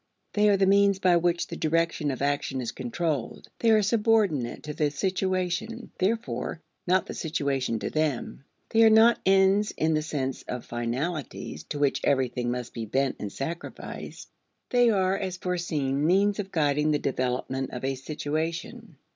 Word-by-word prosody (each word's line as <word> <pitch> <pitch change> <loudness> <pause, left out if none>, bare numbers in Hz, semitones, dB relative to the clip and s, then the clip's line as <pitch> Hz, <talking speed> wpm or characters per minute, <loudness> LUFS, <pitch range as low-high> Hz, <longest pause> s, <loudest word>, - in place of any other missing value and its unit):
They 210 0 +4
are 200 - +4
the 195 - +3
means 200 0 +4
by 185 -3 +4
which 170 0 +1
the - - -7
direction 165 -1 0
of 135 0 -3
action 140 -2 -1
is 120 -2 -3
controlled. 130 +1 -3
They 230 - +3
are 215 -1 +5
subordinate 210 - +1
to 150 - -5
the 150 0 +1
situation, 190 - -2
therefore, 185 - -1 0.3
not 185 0 +3
the - - -6
situation 140 -7 -1
to - - -4
them. 150 -4 -2 0.3
They 225 - +3
are 225 - +8
not 220 +2 +6
ends 195 +2 +4
in 160 0 +2
the 155 - +1
sense 135 -4 -3
of 125 -1 -5
finalities 130 +6 -4
to - - -5
which 145 -1 +1
everything 125 -2 +1
must 125 0 -4
be 115 -2 -5
bent 135 +4 0
and 105 - -5
sacrificed. 165 +9 -7 0.4
They 245 -1 +5
are, 190 -3 +2
as 190 -2 -3
foreseen, 155 -7 -1
means 200 +3 +3
of 195 -1 -4
guiding 150 -1 +2
the 150 - +3
development 130 0 -2
of 125 - -7
a 135 - 0
situation. 160 - -4
160 Hz, 165 wpm, -27 LUFS, 135-195 Hz, 0.4 s, are